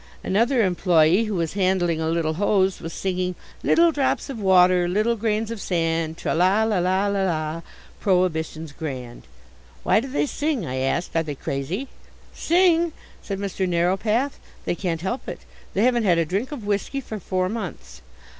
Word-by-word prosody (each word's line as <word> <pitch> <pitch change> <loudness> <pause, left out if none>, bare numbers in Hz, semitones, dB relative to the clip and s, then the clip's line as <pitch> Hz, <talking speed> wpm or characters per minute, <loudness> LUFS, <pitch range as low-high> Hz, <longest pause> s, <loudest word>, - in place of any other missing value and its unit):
Another 230 +4 +2
employe, 180 +2 +3
who 215 -2 -3
was 165 -3 -1
handling 185 -4 +1
a 160 - 0
little 165 -1 0
hose, 195 +1 +1
was 165 - -6
singing, 185 -1 -2 0.3
"Little 335 0 +4
drops 280 -1 0
of 240 - -6
water, 180 -2 +5
little 215 +6 +1
grains 220 0 -1
of 230 -3 -5
sand, 165 -2 -1
Tra, - - -2
la, 185 +6 +3
la, 215 -4 +1
la, 185 +3 +1
la 200 -1 0
la, 160 -2 -2 0.4
Prohibition's 160 -4 0
grand." 130 -6 -6 0.6
"Why - - +4
do 250 - -4
they 275 +3 0
sing?" 290 - -2
I 130 -2 -4
asked. 135 +7 -1
"Are 165 - +3
they 150 -3 -5
crazy?" 140 - -3 0.5
"Sing?" 340 -2 +3 0.3
said 195 - -4
Mr 195 -1 -2
Narrowpath. 195 +10 +1 0.3
"They - - 0
can't 170 -3 -3
help 215 +8 -3
it. - - -7 0.3
They 200 - +2
haven't 240 -2 +3
had 175 -3 +4
a 165 - +2
drink 200 - -2
of 260 -8 -6
whisky 205 +7 -1
for 220 -5 -6
four 185 0 -1
months." 180 - -6
185 Hz, 175 wpm, -23 LUFS, 165-220 Hz, 0.6 s, water